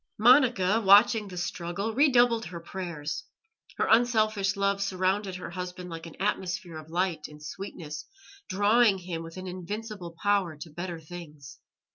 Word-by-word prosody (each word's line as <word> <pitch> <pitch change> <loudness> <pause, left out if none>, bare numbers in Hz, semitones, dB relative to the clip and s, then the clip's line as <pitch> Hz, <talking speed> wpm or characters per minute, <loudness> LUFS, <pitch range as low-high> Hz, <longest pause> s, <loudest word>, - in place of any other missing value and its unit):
Monica, 230 -4 +5
watching 205 +2 +6
the 180 -2 -9
struggle, 175 +4 -3
redoubled 240 -4 +4
her 170 0 -7
prayers; 170 -4 -5 0.5
her - - +2
unselfish 215 -4 +3
love 200 0 +1
surrounded 190 0 0
her 180 - -7
husband 180 0 -6
like 165 0 -7
an 165 - -13
atmosphere 185 -4 -2
of 155 0 -13
light 175 -2 -1
and 150 0 -14
sweetness, 155 -2 -7 0.4
drawing 205 +2 +4
him 175 -3 -5
with 165 +2 -9
an 185 - -6
invincible 185 0 -6
power 200 -6 +1
to 155 +2 -9
better 175 +1 -5
things. 155 -4 -11
185 Hz, 145 wpm, -28 LUFS, 170-210 Hz, 0.5 s, watching